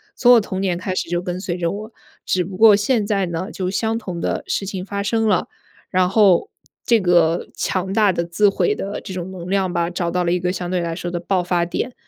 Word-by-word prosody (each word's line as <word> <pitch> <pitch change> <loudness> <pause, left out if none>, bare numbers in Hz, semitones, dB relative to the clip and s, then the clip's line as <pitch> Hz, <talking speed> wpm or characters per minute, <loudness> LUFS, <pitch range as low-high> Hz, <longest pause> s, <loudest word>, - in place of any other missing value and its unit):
从 245 -1 +6
我 240 - +7
童 190 -2 -4
年 180 -3 0
开 185 +1 -3
始 165 - -2
就 175 0 0
跟 180 0 -4
随 185 -2 -3
着 170 -1 -1
我。 215 +3 -7 0.3
只 180 -1 0
不 190 +2 -8
过 215 +2 +7
现 210 +1 +1
在 200 -3 +1
呢 175 +4 -4
就 185 -4 -3
相 220 +3 -1
同 180 -7 -6
的 - - -2
事 195 - -1
情 190 -1 -5
发 200 0 -3
生 225 +1 +1
了， 200 -4 +2 0.4
然 185 0 +2
后 200 - +4 0.3
这 230 -3 +4
个 175 -2 +2
强 190 0 -2
大 205 -1 +3
的 170 - -1
自 175 +5 +2
毁 420 - +1
的 200 - -5
这 190 - -8
种 180 0 -5
能 180 -1 -8
量 190 -2 0
吧， 170 -1 0
找 175 -1 -2
到 180 0 0
了 170 - 0
一 180 - +1
个 180 +1 -1
相 180 -1 -4
对 185 - +1
来 170 -1 -3
说 175 0 -5
的 175 - -2
爆 180 +1 0
发 175 -1 0
点， 245 +8 -3
185 Hz, 270 characters per minute, -20 LUFS, 175-205 Hz, 0.4 s, 我